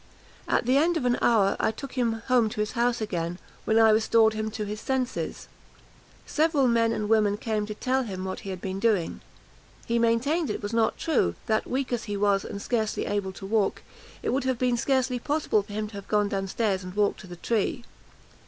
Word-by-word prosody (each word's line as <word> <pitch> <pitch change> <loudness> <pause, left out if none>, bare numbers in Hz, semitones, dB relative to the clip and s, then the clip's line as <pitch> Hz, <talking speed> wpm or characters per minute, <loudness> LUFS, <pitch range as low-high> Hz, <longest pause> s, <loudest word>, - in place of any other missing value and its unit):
At - - +1
the 255 +3 +3
end 335 +4 +3
of 270 - -2
an 245 0 +2
hour, 205 -4 +3
I - - +2
took 270 +5 -7
him 230 -3 -1
home 245 -4 +3
to 215 - -7
his 210 0 0
house 240 -1 0
again, 175 -4 -2 0.3
when 220 - +2
I 225 -1 +7
restored 220 0 +4
him 220 0 -2
to 215 -1 -4
his 210 +1 -5
senses. 260 -2 -2 0.8
Several 305 -4 +2
men 230 -1 +3
and 215 -2 -2
women 210 -2 +3
came 215 -1 -2
to 210 - -5
tell 260 +4 0
him 190 -6 -5
what 190 - -4
he 195 - -8
had 185 -2 -5
been 190 0 -4
doing. 205 -6 +1 0.6
He 235 0 +1
maintained 255 +8 +1
it - - -4
was 205 +2 -4
not 225 -1 +2
true; 255 - +1
that, 220 -1 0
weak 260 0 -2
as 240 - -2
he 205 -2 -3
was, 200 -1 +2
and 200 - -6
scarcely 220 0 -1
able 200 -2 -2
to 195 - -9
walk, 210 0 0 0.4
it - - -1
would 265 +1 0
have 260 -2 +1
been 250 0 +1
scarcely 255 0 +1
possible 285 -5 +1
for 205 +1 -11
him 215 0 -2
to - - -17
have 200 -1 -8
gone 210 -1 +2
down 195 -1 -2
stairs 195 -2 -1
and 180 +1 -8
walked 205 -1 +1
to - - -11
the 175 - -8
tree. 230 +5 -1
220 Hz, 220 wpm, -26 LUFS, 205-245 Hz, 0.8 s, I